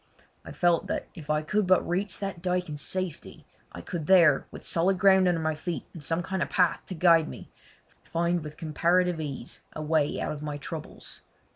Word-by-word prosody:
I - - -9
felt 175 -1 +2
that - - -2
if 155 -3 -11
I 150 0 +1
could 210 +4 0
but 185 -1 +3
reach 185 +3 -1
that 195 -4 -5
dyke 180 -1 -1
in 150 - -5
safety 185 +2 -5 0.3
I - - -8
could 165 -4 -5
there, 170 -7 +5
with - - -11
solid 185 +3 +2
ground 190 0 +5
under 175 -2 +2
my 155 0 0
feet 165 +2 -5
and 165 - -9
some 165 +4 -1
kind 190 +1 -3
of - - -1
path 180 -4 +2
to 185 - -5
guide 165 -1 +4
me, - - -10 0.5
find 170 0 -1
with 150 0 -9
comparative 170 +1 +1
ease 130 -6 -6
a 155 - -5
way 155 -1 +1
out - - -2
of 150 - -6
my 150 -1 -4
troubles. 155 +2 -8
170 Hz, 205 wpm, -27 LUFS, 155-180 Hz, 0.5 s, there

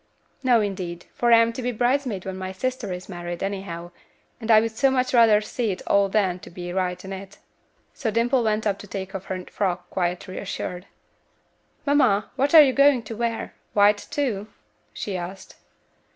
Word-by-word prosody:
"No, 245 -4 +4
indeed, 185 -4 -4
for 240 0 +1
I 230 - +9
am 230 0 +3
to 255 - -5
be 250 0 -1
bridesmaid 245 -4 0
when 190 -1 -4
my 190 0 -5
sister 250 +1 -3
is 180 0 -6
married, 175 -1 -5
anyhow, 190 -3 -5 0.5
and 225 -1 -7
I 220 -1 +8
would 225 0 -2
so 270 +3 +3
much 255 -1 0
rather 225 -3 +6
see 225 +1 -2
it 185 - -4
all 200 0 +3
than 190 -3 +1
to - - -12
be 175 0 -7
right 180 -1 -2
in 195 - -6
it." 195 +1 -9 0.6
So 235 - -2
Dimple 235 +3 +2
went 215 0 0
up 200 -2 0
to 205 - -10
take 190 0 -6
off 190 -1 -6
her 185 -1 -5
frock 180 -3 -3
quite 175 -1 -1
reassured. 180 0 -5 1.0
"Mamma, 255 -8 +3
what 275 +5 +2
are 310 - +12
you 265 -2 +2
going 275 -3 +4
to 225 +1 -7
wear? 230 0 -2 0.2
White, 205 0 +4
too?" 225 -8 -2 0.4
she 200 - -5
asked. 185 +2 -7
205 Hz, 190 wpm, -24 LUFS, 185-235 Hz, 1.0 s, are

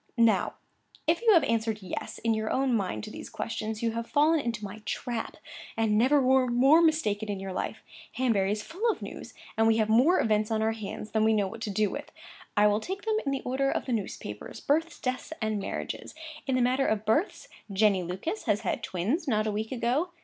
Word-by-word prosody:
Now, 230 -2 +3 0.5
if 330 +4 +2
you 460 -2 +5
have 330 - +6
answered 225 -3 0
"Yes," 185 - -5
in 230 -1 +1
your 220 0 -1
own 265 -1 +1
mind 195 -2 -2
to 215 - -7
these - - -8
questions, 220 -1 -4
you 230 - +2
have 230 +1 -4
fallen 310 +2 +4
into 230 -5 -3
my 205 +2 -8
trap, 235 0 -4 0.4
and 220 -2 +2
never 260 +7 +4
were 260 -1 +4
more 265 +7 +5
mistaken 220 -11 +1
in 200 -2 -2
your 190 -1 -5
life. - - -4 0.3
Hanbury 215 -7 +1
is 210 0 -2
full 400 +8 -1
of 440 - -2
news; - - -8 0.2
and 225 0 +3
we 225 0 +4
have 215 -1 +1
more 255 +11 +5
events 215 -1 +2
on 220 -1 +1
our 220 - +2
hands 215 -1 -6
than 220 0 +2
we 220 0 +4
know 205 -2 +2
what 225 +3 -9
to 225 - -3
do 205 0 +1
with. - - -6 0.5
I 205 - +6
will 210 0 +4
take 380 - -5
them 440 -1 +1
in - - +2
the 275 - -1
order 270 +2 0
of - - -1
the 255 - -1
newspapers—births, 255 - -2
deaths, 255 +4 -3
and 215 -2 -1
marriages. 195 - -5 0.3
In 265 - +1
the 255 - +3
matter 260 +2 +2
of 215 0 0
births, 295 - 0 0.2
Jenny 195 -1 +3
Lucas 190 - -4
has 210 - +1
had - - -2
twins 235 - -1
not 215 -4 +2
a 215 - 0
week 215 +1 -3
ago. 260 +7 0
225 Hz, 220 wpm, -28 LUFS, 210-270 Hz, 0.5 s, have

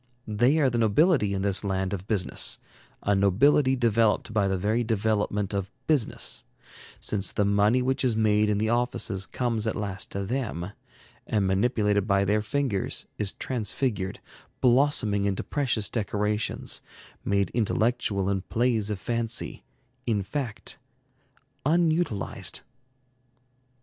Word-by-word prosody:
They 120 +8 +3
are 140 -5 +3
the 120 - 0
nobility 115 - +3
in 95 - -2
this 100 0 +1
land 95 -1 -1
of 95 0 -5
business, 100 -5 0 0.5
a 100 - +2
nobility 130 +8 +4
developed 115 -3 +2
by 105 -2 +2
the 95 0 0
very 110 +6 +1
development 105 -2 0
of 100 -1 -2 0.2
business; 145 -8 0 0.6
since 100 -1 -1
the 105 - +1
money 105 +5 +3
which 130 +1 0
is 125 -4 +2
made 105 -1 +3
in 105 - +2
the 110 +1 0
offices 115 -5 -1
comes 115 -3 -1
at 110 - -1
last 100 -3 -4
to 100 0 -3
them, 105 -6 -3 0.6
and 105 -3 +1
manipulated 105 +1 +1
by 100 -1 +3
their 105 +2 +2
fingers, 115 -3 -1
is 100 -2 -1
transfigured, 110 -4 -2 0.4
blossoming 120 -6 +3
into 100 -2 -1
precious 120 -7 0
decorations, 105 -1 -1 0.4
made 100 -2 +1
intellectual 110 -3 +1
in 100 -1 0
plays 115 0 0
of 105 -3 -2
fancy, 115 +3 -2 0.4
in 105 -4 +1
fact, 115 +1 -4 0.8
unutilized. 160 - +1
105 Hz, 130 wpm, -27 LUFS, 100-120 Hz, 0.8 s, nobility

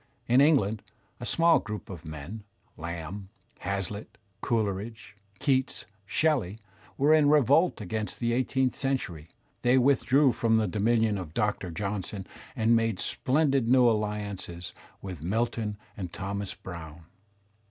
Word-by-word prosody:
In 125 +3 +5
England 110 -9 +3 0.4
a 120 - -5
small 165 0 +4
group 105 -5 -6
of 85 -3 -9
men, 80 +8 -7 0.3
Lamb, 85 +4 -6 0.3
HazUtt, 100 +2 -4 0.2
Coleridge, 105 -2 -2 0.2
Keats, 130 +1 0 0.2
Shelley, 125 - +1 0.4
were 145 +3 +4
in 150 -2 +5
revolt 150 +4 +4
against 105 +2 -4
the 115 -1 0
eighteenth 130 +1 +1
century; 110 - -3 0.3
they 125 +2 +4
withdrew 135 +1 +4
from 115 -1 +2
the 110 -1 +2
dominion 110 +1 +2
of 80 -4 -8
Doctor 105 -4 0
Johnson 100 +2 -4 0.3
and 115 -1 +3
made 115 -4 +1
splendid 135 -3 +1
new 125 -1 +6
alliances 105 -5 -2 0.3
with 90 -6 -6
Milton 105 +3 -1 0.2
and 90 -4 -5
Thomas 100 +1 -4
Browne. 80 -3 -9
105 Hz, 125 wpm, -28 LUFS, 95-125 Hz, 0.4 s, new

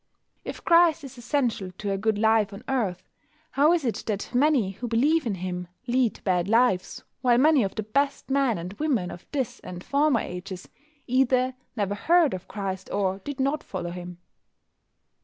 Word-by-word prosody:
If - - -8
Christ 335 -2 +5
is 270 -2 -10
essential 240 -7 -1
to 205 -1 -3
a 195 - 0
good 220 +1 +1
life 220 -1 +3
on 200 - -10
earth, 200 -9 -1 0.5
how 290 +4 +4
is 340 -5 +1
it 235 - -1
that 205 +1 -3
many 255 -6 +3
who 225 +6 -6
believe 280 +6 +2
in 205 - -1
Him 180 -1 -4 0.2
lead 245 -1 +1
bad 180 -2 +1
lives, 225 -4 +2 0.2
while 245 -2 +4
many 295 +1 +5
of 195 -3 -2
the 215 - -2
best 275 +6 -1
men 270 -5 +2
and 175 +3 -6
women 250 -13 0
of 175 - -11
this 270 -5 -2
and 180 0 -9
former 280 -4 +2
ages 180 +1 -7 0.4
either 255 0 +2 0.2
never 205 -3 -1
heard 330 +8 +3
of 185 0 -6
Christ 190 -2 -5
or 195 -1 0
did 285 +7 -7
not 275 +3 0
follow 180 -2 -5
Him? 180 0 -8
230 Hz, 175 wpm, -26 LUFS, 190-275 Hz, 0.5 s, Christ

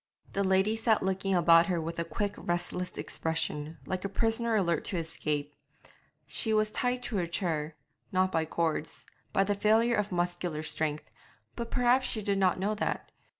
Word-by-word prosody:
The 200 - +1
lady 190 +3 +3
sat 225 -1 +2
looking 190 0 0
about 170 -1 +6
her 180 -3 0
with 165 +1 -4
a - - +1
quick 200 +4 -2
restless 175 +1 -3
expression, 160 -1 -3
like 185 0 -3
a 200 - -2
prisoner 225 +2 +1
alert 170 -6 +1
to 185 - -1
escape; 150 -3 -2 0.7
she 220 -3 0
was 215 0 +2
tied 250 +2 -1
to 230 -3 -2
her 175 -2 0
chair 160 -3 -2 0.4
not 185 0 +2
by 160 -2 +1
cords 160 -1 -2 0.3
by 195 - +3
the 205 +1 +1
failure 220 +4 +3
of 210 -1 -1
muscular 175 -3 -1
strength; 155 -6 -2 0.4
but 235 -1 -4
perhaps 250 +1 +3
she 215 - -1
did 200 -1 +1
not 185 -2 +3
know 200 +3 0
that. 210 - -2
185 Hz, 175 wpm, -30 LUFS, 165-215 Hz, 0.7 s, about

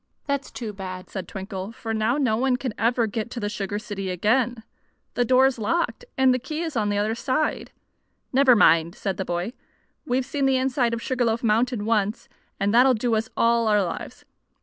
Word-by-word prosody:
"That's 280 -1 -2
too 225 -4 -6
bad," 185 -2 -7
said 190 -3 -5
Twinkle; 195 0 -6
"for 225 0 -5
now 220 +4 +1
no 255 -7 +2
one 255 +2 +2
can 250 -3 -4
ever 235 +1 +1
get 220 +1 -4
to 240 - -6
the 205 -2 -2
sugar 205 -1 -3
city 205 -3 -5
again. 225 +6 +1 0.5
The 245 - +1
door 255 +2 +5
is 265 -3 +1
locked, 340 - -1
and 265 -1 +5
the 255 - 0
key 305 +6 -5
is 320 -4 -4
on 210 -3 +1
the 205 - 0
other 210 +2 +1
side." 260 +6 -1 0.6
"Never 260 -1 +6
mind," 165 -3 +4
said 195 -2 -3
the 190 - -3
boy. 175 +6 -3 0.5
"We've 255 0 0
seen 275 0 0
the 265 -1 +3
inside 255 -2 +1
of 230 - -7
Sugar 255 -2 0
Loaf 230 +1 0
Mountain 230 0 +1
once, 215 0 0 0.3
and 200 +2 +1
that'll 255 +2 +6
do 230 +1 -1
us 220 0 0
all 230 0 +3
our 210 -2 +3
lives. 175 - -6
230 Hz, 205 wpm, -24 LUFS, 205-255 Hz, 0.6 s, Never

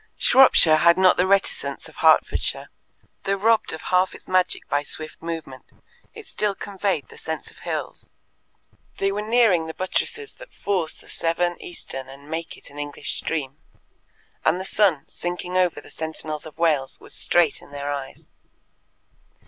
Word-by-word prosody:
Shropshire 175 -12 +6
had 170 +2 +5
not 185 -1 +5
the 180 - +3
reticence 195 0 0
of - - -16
Hertfordshire. - - +2 0.5
Though 195 - +2
robbed 220 +3 +2
of 160 - -7
half 185 +1 +3
its - - -13
magic 185 -1 +1
by 145 +1 +1
swift 155 +1 -5
movement, 160 -6 -6 0.5
it 445 - -10
still 210 - -1
conveyed 195 -6 -2
the - - -13
sense 160 -3 -5
of - - -18
hills. - - -5 0.9
They 195 0 +1
were 205 +1 -2
nearing 215 -7 +3
the 160 - -6
buttresses 430 - -2
that - - -13
force 185 -6 -1
the - - -18
Severn 175 +1 0
eastern 135 -6 -7
and 140 +3 -13
make 165 +1 -4
it - - -12
an 145 - -10
English 145 0 -4
stream, 145 -4 -3 0.9
and 165 +3 +2
the 190 - -5
sun, 190 -7 +2
sinking 180 +1 -5
over 180 -2 +2
the - - -14
Sentinels 155 -1 -4
of 155 - -14
Wales, 155 -5 +1
was - - -10
straight 170 -4 +2
in - - -16
their 145 0 -4
eyes. 140 -2 -6
170 Hz, 165 wpm, -23 LUFS, 155-195 Hz, 0.9 s, Shropshire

